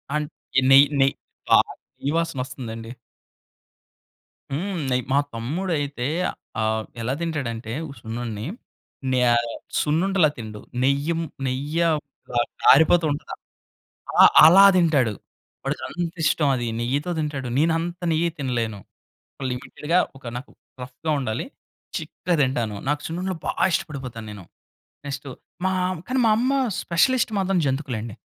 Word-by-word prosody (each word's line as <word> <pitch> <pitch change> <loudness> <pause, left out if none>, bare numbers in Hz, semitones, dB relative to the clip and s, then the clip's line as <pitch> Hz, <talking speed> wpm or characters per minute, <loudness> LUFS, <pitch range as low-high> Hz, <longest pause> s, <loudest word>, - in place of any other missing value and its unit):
And 150 -1 -1 0.4
నెయ్ 140 +1 +9
నె 135 - +6 0.5
ఆ! - - +8 0.4
నెయ్యి 140 - -1
వాసనొస్తుందండి. 125 -8 -4 1.6
హ్మ్. 185 +5 -2
నెయ్యి. 125 -1 +1
మా - - +4 0.2
తమ్ముడైతే 145 0 -2 0.6
ఆహ్, 110 0 0 0.2
ఎలా 120 +3 -1
తింటాడంటే 120 -9 -3 0.2
ఉ - - -8
సున్నుండని 110 -1 -5 0.7
నే 130 - +2 0.6
సున్నుండలా 170 +2 +2
తిండు. 110 -2 -7 0.2
నెయ్యిం 140 +5 +1 0.3
నెయ్య 145 +6 -1 0.5
కా 120 - 0 0.2
కారిపోతుంటది. 155 0 +4 0.8
అలా, - - +7 0.2
అలా 190 +5 +9
తింటాడు. 145 -10 +3 0.5
వాడికంత 175 0 -3
ఇష్టం 145 0 +3
అది 120 -1 -2
నెయ్యితో 140 +8 -1
తింటాడు. 145 -4 -3
నెన్నంత 165 +3 +1
నెయ్యి 165 +2 +2
తినలేను. 120 -6 -2 0.6
ఒక 135 - -5
లిమిటెడ్‌గా 150 +7 -1 0.2
ఒక 135 - -18
నాకు 125 - -9 0.3
రఫ్‌గా 130 +5 -4
ఉండాలి. 120 -3 -2 0.5
చిక్కగా 180 - -2
తింటాను 120 -5 0
నాకు 145 +1 0
సున్నుండలు 180 +2 -3
బా - - +1 0.2
ఇష్టపడిపోతానేను. 115 - -4 0.6
నెక్స్ట్ 140 0 -5 0.4
మా 190 - +2 0.3
కానీ 260 +1 -1
మా - - +5
అమ్మ 255 +3 +1 0.3
స్పెషలిస్ట్ 240 +7 +2
మాత్రం 190 -1 +1
జంతుకులండి. 130 -6 -2
140 Hz, 110 wpm, -24 LUFS, 120-165 Hz, 1.6 s, నెయ్